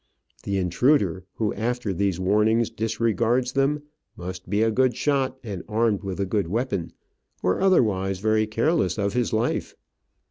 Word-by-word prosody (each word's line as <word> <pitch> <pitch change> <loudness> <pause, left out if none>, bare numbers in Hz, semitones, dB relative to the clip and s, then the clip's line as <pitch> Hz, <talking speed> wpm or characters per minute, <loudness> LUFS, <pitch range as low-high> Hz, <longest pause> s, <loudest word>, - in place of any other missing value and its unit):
The 100 -1 -1
intruder 95 - +2
who, 110 -2 -1
after 115 -1 -2
these 95 -1 0
warnings, 105 +4 +2
disregards 115 +3 0
them, 140 +3 +1 0.3
must 90 +1 -7
be 105 +3 +2
a 115 - +2
good 125 +1 +2
shot 135 -3 0
and 100 -6 -5
armed 110 -2 +1
with 95 -2 -5
a 100 - +1
good 100 -2 -1
weapon, 100 -3 -2 0.5
or 90 - +1
otherwise 100 - +2
very 110 +2 +1
careless 115 - +1
of 100 -1 -1
his 125 -1 0
life. 110 +2 -1
110 Hz, 150 wpm, -24 LUFS, 95-125 Hz, 0.5 s, intruder